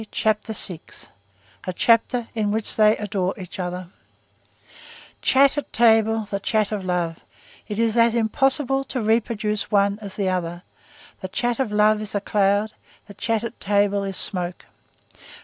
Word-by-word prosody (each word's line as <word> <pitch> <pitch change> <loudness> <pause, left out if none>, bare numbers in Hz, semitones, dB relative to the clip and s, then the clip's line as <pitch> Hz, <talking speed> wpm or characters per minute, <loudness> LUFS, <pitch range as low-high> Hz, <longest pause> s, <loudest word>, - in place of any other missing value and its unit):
CHAPTER 215 0 -1
VI—A 100 - -8
CHAPTER 230 +3 +2
IN 215 -2 -1
WHICH 215 +1 -2
THEY 215 0 +4
ADORE 195 -2 -2
EACH 185 0 -9
OTHER 180 0 -4 1.3
Chat 275 +2 +4
at - - -9
table, 225 -1 +3
the 200 - -1
chat 215 0 0
of 205 -3 -3
love; 175 -2 -2 0.5
it 210 - -5
is 225 -1 +1
as 230 0 +4
impossible 270 +4 +1
to 260 - -3
reproduce 215 -1 0
one 200 0 +2
as 200 -2 -8
the 200 -2 -1
other; 175 -1 -2 0.6
the 190 - -5
chat 240 +5 -1
of 255 -6 -1
love 210 0 +3
is 215 -1 -4
a - - +2
cloud; 205 +1 +1 0.3
the 205 - -12
chat 225 +2 -1
at 235 - -6
table 200 0 +1
is 195 -1 -2
smoke. 180 -2 +1
210 Hz, 150 wpm, -23 LUFS, 190-225 Hz, 1.3 s, THEY